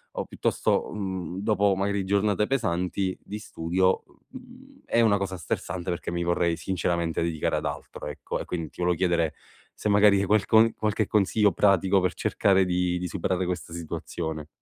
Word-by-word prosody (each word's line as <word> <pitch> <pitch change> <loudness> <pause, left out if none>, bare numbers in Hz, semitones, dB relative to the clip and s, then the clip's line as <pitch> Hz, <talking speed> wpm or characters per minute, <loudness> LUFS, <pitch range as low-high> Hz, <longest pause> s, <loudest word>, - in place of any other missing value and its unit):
o - - -1
piuttosto, - - 0
uhm, 95 -3 -4
dopo 100 -1 +2
magari 100 0 -1
giornate 100 +1 +2
pesanti 95 -6 -1
di 105 +1 -6
studio, 95 -1 0
u - - -25 0.2
uhm, 260 +2 -16
è 115 - +2
una 105 -3 +4
cosa 95 -1 -3
stressante 90 +3 -4
perché 85 -1 -3
mi 85 0 -1
vorrei 85 -1 +1
sinceramente 85 -2 -1
dedicare 80 -3 -1
ad - - -4
altro - - -6
ecco, - - -5
e - - -5
quindi 85 -3 -4
ti - - -20
volevo 90 -1 +2
chiedere 85 -4 +1 0.4
se 105 - -3
magari 100 -1 +5
hai 100 - +1
qualcon 110 +2 +4
qualche 110 -1 0
consiglio 105 0 +3
pratico 95 +1 +3
per 90 -1 0
cercare 95 +3 +2
di 90 0 0
di 90 - -3
superare 95 0 -1
questa 90 -2 -4
situazione. 80 -2 -5
95 Hz, 170 wpm, -26 LUFS, 85-105 Hz, 0.4 s, magari